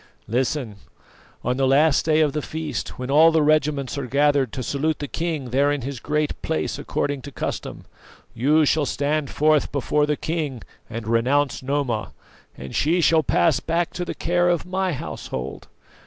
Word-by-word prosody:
"Listen. 125 -2 -1 0.7
On 125 +1 0
the 135 -1 +2
last 140 +2 +4
day 155 0 +3
of 150 -3 +2
the 150 - -1
feast, 155 -4 -5
when 125 +1 -4
all 160 +3 +7
the 160 -1 +3
regiments 145 -2 +1
are 135 - -4
gathered 140 -2 +2
to 130 - -4
salute 145 +4 -1
the 145 - -5
king 155 -6 -3
there 140 +3 +3
in 145 -3 -2
his 135 -1 -5
Great 150 +3 -2
Place 160 - -2
according 145 -1 -2
to 145 - -9
custom, - - -5 0.5
you 150 +6 +3
shall 145 0 +2
stand 145 0 -1
forth 155 0 +2
before 145 +2 +1
the 150 -1 0
king 155 -7 -3 0.3
and 115 -1 -6
renounce 130 +4 +1
Noma, 130 - -2 0.4
and 65 - -8
she 165 +5 +2
shall 165 -1 +4
pass 155 -1 +2
back 170 +1 -1
to 180 - -3
the 175 - -5
care 175 +1 +1
of 175 -1 0
my 185 0 -1
household. 65 - -6
145 Hz, 175 wpm, -23 LUFS, 130-155 Hz, 0.7 s, all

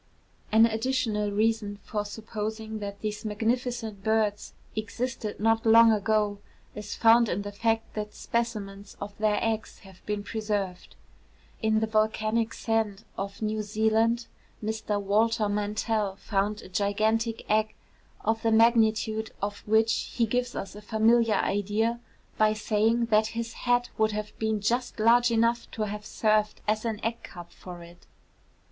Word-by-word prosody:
An 220 +1 +7
additional 225 -2 0
reason 210 0 0
for 210 -1 -3
supposing 220 +1 -5
that 200 -1 -6
these 210 -1 -4
magnificent 225 -1 -2
birds 215 -1 0 0.2
existed 220 0 -4
not 225 +1 +2
long 230 0 +7
ago 210 -1 +1 0.3
is 210 -1 -6
found 230 0 +5
in 200 +3 -1
the 205 - -5
fact 225 +2 -1
that 210 -1 -5
specimens 205 -4 -3
of 200 0 -7
their 210 -1 +2
eggs 225 -1 -2
have 190 -2 -16
been 210 -1 -2
preserved. 205 -4 -3 0.7
In 220 -1 +2
the - - +2
volcanic 220 +1 0
sand 220 -2 -1
of 200 +2 -5
New 215 0 -1
Zealand, 220 +3 +1 0.4
Mr 215 -1 -2
Walter 215 +2 +2
Mantell 210 0 -1
found 205 +1 -2
a - - -11
gigantic 215 +4 0
egg, 215 0 +1 0.5
of 225 0 0
the 225 - +1
magnitude 220 -1 +3
of 205 0 -3
which 220 +1 +4 0.2
he 235 - +3
gives 245 +2 -1
us 195 - -5
a 210 - -9
familiar 220 +1 +3
idea 210 +4 0 0.4
by 215 0 +4
saying 220 +2 +1
that 215 0 +4
his 230 0 -3
hat 245 0 0
would 215 -1 +2
have 210 0 -5
been 220 -1 0
just 240 +4 -1
large 240 +3 +5
enough 230 +1 +1
to 220 - -3
have 210 0 -5
served 215 -1 +1
as 215 +2 0
an 220 -2 -2
egg 230 +1 -2
cup 175 -1 -11
for 175 -2 -10
it. 170 +1 -16
220 Hz, 150 wpm, -27 LUFS, 210-225 Hz, 0.7 s, An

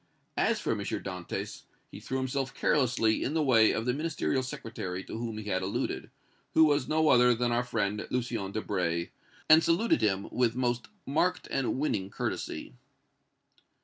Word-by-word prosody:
As - - +2
for - - -1
M. - - -1
Dantès, 90 -3 -5 0.3
he - - -9
threw 130 - -3
himself 130 0 -2
carelessly 125 -6 +2
in 145 - -2
the 160 - +2
way 115 -6 +5
of 115 - -2
the 125 - +1
Ministerial 150 -2 -1
Secretary 100 -7 -5
to - - -8
whom 115 -2 -4
he 110 - -5
had 95 -2 0
alluded, 95 +2 -3 0.5
who 160 - +7
was 145 -3 +3
no 155 0 +3
other 125 0 +6
than 120 +1 0
our 120 +1 +2
friend 105 -4 -2
Lucien 120 -6 -2
Debray, 90 -5 -1 0.4
and 160 +1 +7
saluted 180 +8 +2
him 100 -2 +1
with 120 -2 +1
most 120 -1 -1 0.2
marked 160 +6 0
and 135 -2 0
winning 105 -10 -1
courtesy. 65 - -4
120 Hz, 165 wpm, -29 LUFS, 105-135 Hz, 0.5 s, who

